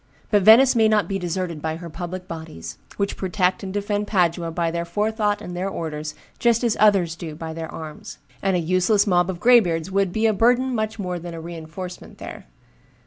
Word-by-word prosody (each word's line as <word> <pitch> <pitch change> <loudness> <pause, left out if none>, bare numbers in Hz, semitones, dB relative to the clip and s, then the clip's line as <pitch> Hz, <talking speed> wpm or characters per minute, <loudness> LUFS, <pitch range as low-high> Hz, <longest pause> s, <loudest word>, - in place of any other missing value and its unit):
But 205 -2 +4
Venice 240 +6 +7
may 220 -1 +5
not 215 -1 +2
be 195 -1 -2
deserted 175 -2 -3
by 160 0 -2
her 170 +1 -8
public 180 +3 -6
bodies, 85 - -8 0.2
which 200 0 -1
protect 185 -1 0
and 190 - -5
defend 205 +1 -2
Padua 175 -4 +1
by 165 0 -1
their 170 0 -2
forethought 210 +3 -1
and 180 - -6
their 185 +2 -2
orders 155 -3 -5 0.2
just 235 0 +3
as 235 -3 +2
others 195 -6 +4
do 165 -3 -7
by 160 0 -6
their 160 -1 -6
arms; 155 -2 -8 0.2
and 195 -1 +1
a - - +2
useless 185 +5 +2
mob 180 -2 +2
of 180 -2 -4
graybeards 190 -8 +4
would 195 -1 +1
be 220 +4 0
a 220 - +4
burden 245 +5 +3
much 215 -1 -2
more 180 -4 -3
than 170 0 -7
a - - -6
reenforcement 170 +2 -8
there. - - -9
185 Hz, 200 wpm, -23 LUFS, 165-210 Hz, 0.2 s, Venice